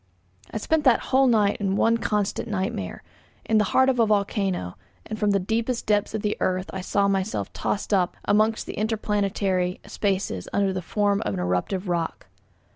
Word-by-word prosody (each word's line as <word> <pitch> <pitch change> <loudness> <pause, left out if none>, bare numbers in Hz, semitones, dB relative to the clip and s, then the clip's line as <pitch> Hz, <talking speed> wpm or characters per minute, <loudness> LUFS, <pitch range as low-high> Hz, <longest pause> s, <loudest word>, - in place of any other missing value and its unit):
I - - -4
spent 310 +8 +1
that 250 -3 +6
whole 265 0 +5
night 210 -4 +3
in 195 -1 0
one 230 +3 +3
constant 210 +1 -1
nightmare; 205 +2 -3 0.4
in 220 -1 +3
the 210 - +3
heart 260 +6 +3
of 260 -2 +2
a 230 - +5
volcano, 195 - 0 0.3
and 215 -1 -6
from 210 - +2
the 200 -1 +3
deepest 230 +5 -1
depths 210 0 +1
of 215 - -3
the 210 0 0
earth 185 0 -1
I 190 - -3
saw 200 +2 +1
myself 195 +1 -1
tossed 210 +1 -2
up 185 -3 +1
amongst 215 +2 +2
the - - -6
interplanetary 200 -4 0
spaces 190 - -2
under 195 -1 +1
the 185 - -3
form 205 +2 0
of 100 - -2
an - - -3
eruptive 90 - -1
rock. 170 -8 -2
205 Hz, 185 wpm, -25 LUFS, 190-220 Hz, 0.4 s, that